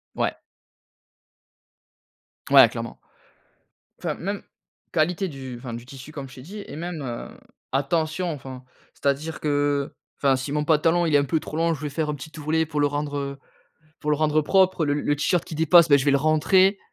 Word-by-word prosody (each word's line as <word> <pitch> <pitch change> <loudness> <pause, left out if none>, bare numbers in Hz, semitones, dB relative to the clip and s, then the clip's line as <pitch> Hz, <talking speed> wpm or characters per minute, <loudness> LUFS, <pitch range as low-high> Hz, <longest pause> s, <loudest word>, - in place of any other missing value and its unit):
Ouais. - - 0 2.2
Ouais, - - +9
clairement. - - -6 1.0
Enfin, - - -2
même 200 +1 -4 0.5
qualité 175 +4 +1
du 135 -5 -7
enfin, 120 -1 -7
du 120 +1 -7
tissu 135 +3 -11
comme 140 -3 -7
je - - -14
t'ai 130 - -10
dit 200 +9 -8
et - - -8
même, 170 0 -5
heu, 120 -4 -5 0.4
attention. 160 +5 0
Enfin, 130 -3 -8 0.3
c'est - - -18
à 140 - +5
dire 155 +3 -7
que, - - -3 0.4
heu, - - -39 0.2
enfin 135 -2 +3
si 130 +2 -4
mon 150 0 0
pantalon 165 +3 +3
il 155 -3 +2
est - - +8
un 140 - +3
peu 150 +4 0
trop 155 - -7
long 165 0 +2
je 145 - -7
vais 150 - -3
faire 150 +2 -2
un 150 - -1
petit 145 +3 -10
ourlet 160 +2 +1
pour 150 -1 -3
le 145 - +4
rendre, 145 0 -3
heu, 140 -1 -4 0.6
pour 150 - -2
le 150 - +3
rendre 155 0 +2
propre, 185 0 +3
le 145 -1 +1
le 145 0 0
t-shirt 170 +3 +1
qui - - -8
dépasse 160 +2 +6
ben, 145 -1 +6
je 135 - -1
vais 145 - +4
le 140 - +4
rentrer. 185 +7 +3
150 Hz, 205 wpm, -24 LUFS, 140-165 Hz, 2.2 s, Ouais